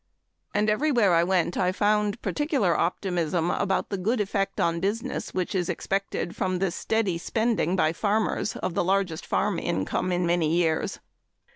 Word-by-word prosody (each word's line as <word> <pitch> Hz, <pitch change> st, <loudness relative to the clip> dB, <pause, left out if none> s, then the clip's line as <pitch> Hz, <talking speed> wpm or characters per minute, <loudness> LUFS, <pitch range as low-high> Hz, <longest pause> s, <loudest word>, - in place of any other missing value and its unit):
And 210 Hz, +1 st, +2 dB
everywhere 225 Hz, -, +3 dB
I 165 Hz, 0 st, +4 dB
went 180 Hz, -1 st, +1 dB
I 180 Hz, 0 st, +2 dB
found 210 Hz, +2 st, +1 dB
particular 280 Hz, -, +1 dB
optimism 175 Hz, -1 st, 0 dB
about 195 Hz, -2 st, 0 dB
the 200 Hz, -, -3 dB
good 220 Hz, +6 st, 0 dB
effect 195 Hz, -1 st, -1 dB
on 170 Hz, 0 st, +1 dB
business 225 Hz, +8 st, -2 dB
which 185 Hz, +1 st, -2 dB
is 180 Hz, -3 st, -1 dB
expected 195 Hz, -3 st, -2 dB
from 185 Hz, -1 st, -1 dB
the 190 Hz, -1 st, 0 dB
steady 195 Hz, -1 st, -1 dB
spending 220 Hz, -3 st, 0 dB
by 160 Hz, -4 st, +2 dB
farmers 210 Hz, +1 st, 0 dB
of 185 Hz, -, -3 dB
the -, -, +1 dB
largest 185 Hz, -3 st, 0 dB
farm -, -, 0 dB
income 95 Hz, -, -1 dB
in 175 Hz, 0 st, +1 dB
many 170 Hz, -2 st, +2 dB
years. 165 Hz, -2 st, 0 dB
190 Hz, 160 wpm, -26 LUFS, 175-210 Hz, -, I